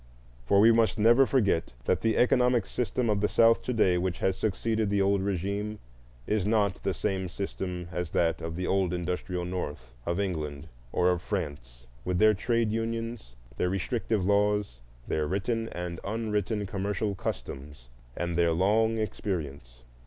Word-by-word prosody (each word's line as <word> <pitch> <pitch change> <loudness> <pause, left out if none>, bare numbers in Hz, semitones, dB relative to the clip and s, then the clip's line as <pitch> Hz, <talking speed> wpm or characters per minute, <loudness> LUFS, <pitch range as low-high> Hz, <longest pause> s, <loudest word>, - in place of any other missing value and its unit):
For 100 - +5
we 110 +3 +7
must 115 0 +3
never 120 +5 +5
forget 100 - +1
that - - +1
the 110 -1 +1
economic 125 -3 +3
system 125 +2 -1
of 105 -2 +1
the 105 - +3
South 115 +1 +4
to - - -3
day 95 -7 +3
which 90 -1 -1
has 95 - 0
succeeded 110 +2 -1
the 100 0 +1
old 100 0 +2
regime 100 +2 -2 0.5
is 105 -2 0
not 105 -2 +1
the - - -1
same 95 -3 -2
system 90 -2 -4
as 90 -2 -3
that 80 0 +1
of 80 0 -4
the 90 +1 -3
old 95 -2 +1
industrial 90 +1 -3
North, 75 -9 -5
of 85 +2 0
England, 80 -6 -3 0.2
or 90 0 +3
of 90 -1 -1
France, 70 - -5 0.2
with 90 -1 -1
their 110 +2 +6
trade 115 +2 0
unions, 115 - -3 0.2
their 90 - +1
restrictive 100 +1 -1
laws, 100 -8 +1 0.3
their 75 -1 0
written 115 +6 -1
and 90 -1 -5
unwritten 105 -1 -1
commercial 100 +1 -2
customs, 70 -7 -6 0.3
and 85 -1 -2
their 85 -1 +3
long 110 +6 +2
experience. 75 - -4
95 Hz, 160 wpm, -28 LUFS, 85-110 Hz, 0.5 s, we